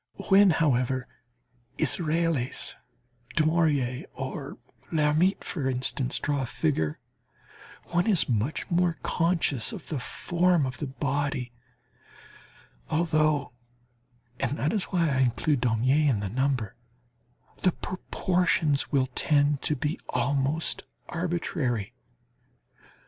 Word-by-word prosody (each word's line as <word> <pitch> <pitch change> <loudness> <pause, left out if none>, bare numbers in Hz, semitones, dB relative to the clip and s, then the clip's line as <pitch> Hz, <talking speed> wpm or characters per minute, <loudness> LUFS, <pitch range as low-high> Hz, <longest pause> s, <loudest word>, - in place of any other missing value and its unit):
When, 195 0 +7
however, 130 -5 +1 0.7
Israels, 160 -5 0 0.6
Daumier 155 -6 +1
or - - -5 0.3
Lhermitte, 155 +4 +2
for 140 -7 -2
instance, 130 0 0
draw 145 -1 -1
a 130 - -3
figure, 115 - -1 0.9
one 175 +3 +1
is 195 -6 +5
much 120 +5 -1
more 170 -1 +2
conscious 165 -8 +1
of 180 - -9
the 150 - -2
form 175 +4 +1
of 130 0 -5
the 150 - -3
body, 135 -2 -2 1.4
although 155 -4 +1 0.9
and 135 +2 -1
that 150 +8 0
is 205 -4 0
why 175 -3 +1
I 135 -3 +1
include 125 +2 +1
Daumier 130 +5 +2
in 115 -6 +1
the 100 -1 -3
number 130 -2 -1 0.8
the 185 - +2
proportions 175 -5 0
will 135 -2 +2
tend 145 0 +2
to 150 - +1
be 150 +4 -2
almost 140 +5 0 0.3
arbitrary. 160 - -2
145 Hz, 105 wpm, -27 LUFS, 130-165 Hz, 1.4 s, When